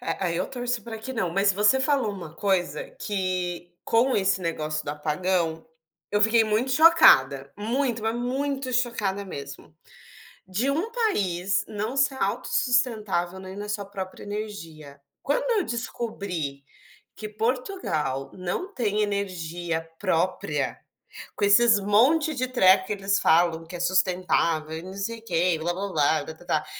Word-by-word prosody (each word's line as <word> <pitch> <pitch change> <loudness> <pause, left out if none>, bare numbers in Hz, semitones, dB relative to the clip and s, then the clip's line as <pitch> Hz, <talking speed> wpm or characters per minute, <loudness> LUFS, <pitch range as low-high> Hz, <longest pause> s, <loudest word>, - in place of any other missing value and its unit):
É, 250 - -3
aí 170 -1 -1
eu 185 - -1
torço 245 -2 -3
para 225 0 -7
que 245 +4 -6
não. 205 -8 -1
Mas 195 +3 +3
você 210 +7 +3
falou 265 -6 +1
uma 170 -5 -9
coisa 175 -6 0 0.2
que, 185 -3 -2
com 240 +3 +3
esse 190 -1 +1
negócio 155 -3 -3
do - - -8
apagão, 160 +2 -1 0.4
eu 205 - +1
fiquei 220 +2 +5
muito 220 +4 0
chocada, 140 - +6
muito, 230 +2 -1
mas 225 +1 0
muito 265 +2 -2
chocada 220 -5 0
mesmo. 140 -3 -9 0.7
De 210 +9 0
um 330 +11 -1
país 200 - 0
não 215 +5 -4
ser 270 0 +2
autossustentável 215 -5 0
nem 190 0 -9
na 205 +1 -6
sua 205 -1 -3
própria 190 -1 -7
energia. 165 -9 -7 0.2
Quando - - +1
eu - - 0
descobri 200 - -4 0.5
que 215 - -6
Portugal 215 - -2
não 185 - -4
tem 215 -3 0
energia 175 -5 -3
própria, 165 -6 -1 0.6
com - - 0
esses 210 +1 +5
monte 265 +11 +3
de 255 -1 -1
treco, 190 -6 +5
que - - -3
eles 195 -1 0
falam 165 0 +3
que 175 - -7
é - - -9
sustentável 175 -3 +1
e - - -8
não 185 +2 -9
sei 200 +4 -4
o 225 - -24
que 175 -3 +1
blá-blá-blá 170 -2 0
e - - -10
blá-blá-blá 160 -1 -3
200 Hz, 150 wpm, -25 LUFS, 175-235 Hz, 0.7 s, chocada